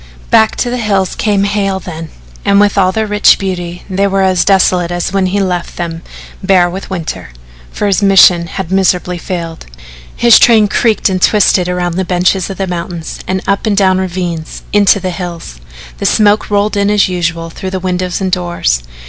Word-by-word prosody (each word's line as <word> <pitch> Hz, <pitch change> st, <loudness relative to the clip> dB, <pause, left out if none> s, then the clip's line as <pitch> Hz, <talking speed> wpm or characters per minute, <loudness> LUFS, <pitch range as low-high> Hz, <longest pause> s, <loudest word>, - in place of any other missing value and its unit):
Back 220 Hz, 0 st, +4 dB
to 245 Hz, -, -2 dB
the 250 Hz, -, -3 dB
hills 200 Hz, -4 st, 0 dB
came 205 Hz, -2 st, 0 dB
Hale 200 Hz, -1 st, -1 dB
then, 165 Hz, -3 st, -8 dB, 0.3 s
and 200 Hz, 0 st, +3 dB
with 205 Hz, -1 st, +2 dB
all 185 Hz, -2 st, +2 dB
their 220 Hz, +3 st, -1 dB
rich 210 Hz, 0 st, +4 dB
beauty 180 Hz, -2 st, -5 dB
they 195 Hz, +1 st, 0 dB
were 195 Hz, 0 st, 0 dB
as 185 Hz, -2 st, +2 dB
desolate 185 Hz, -3 st, +2 dB
as 175 Hz, +1 st, -3 dB
when 195 Hz, -1 st, +1 dB
he 200 Hz, +2 st, -1 dB
left 180 Hz, -3 st, -3 dB
them 165 Hz, -1 st, -5 dB, 0.4 s
bare 185 Hz, -2 st, +3 dB
with 185 Hz, +3 st, -7 dB
winter, 160 Hz, -, -5 dB, 0.4 s
for -, -, -3 dB
his 200 Hz, 0 st, +1 dB
mission 190 Hz, -3 st, +5 dB
had 180 Hz, +1 st, -6 dB
miserably 180 Hz, -2 st, 0 dB
failed. 165 Hz, -2 st, -6 dB, 0.5 s
His 235 Hz, -1 st, +5 dB
train 220 Hz, -3 st, +5 dB
creaked 220 Hz, +1 st, +1 dB
and 185 Hz, -2 st, -2 dB
twisted 190 Hz, -4 st, +3 dB
around 175 Hz, -1 st, -2 dB
the 190 Hz, -, 0 dB
benches 180 Hz, +1 st, 0 dB
of 195 Hz, -, -6 dB
the 195 Hz, -, -2 dB
mountains, 170 Hz, -2 st, -6 dB
and 190 Hz, 0 st, -2 dB
up 200 Hz, +3 st, -1 dB
and 205 Hz, -2 st, 0 dB
down 190 Hz, -2 st, +3 dB
ravines 175 Hz, -3 st, -4 dB
into 205 Hz, -1 st, +4 dB
the 185 Hz, -1 st, -3 dB
hills. 170 Hz, -, -7 dB, 0.4 s
The -, -, 0 dB
smoke 210 Hz, 0 st, +2 dB
rolled 205 Hz, +1 st, 0 dB
in 200 Hz, 0 st, +1 dB
as 210 Hz, -1 st, +3 dB
usual 165 Hz, -2 st, -3 dB
through 190 Hz, -, -6 dB
the 190 Hz, 0 st, -4 dB
windows 180 Hz, -1 st, -2 dB
and 190 Hz, -1 st, -2 dB
doors. 175 Hz, -, -1 dB
185 Hz, 190 wpm, -12 LUFS, 175-200 Hz, 0.5 s, mission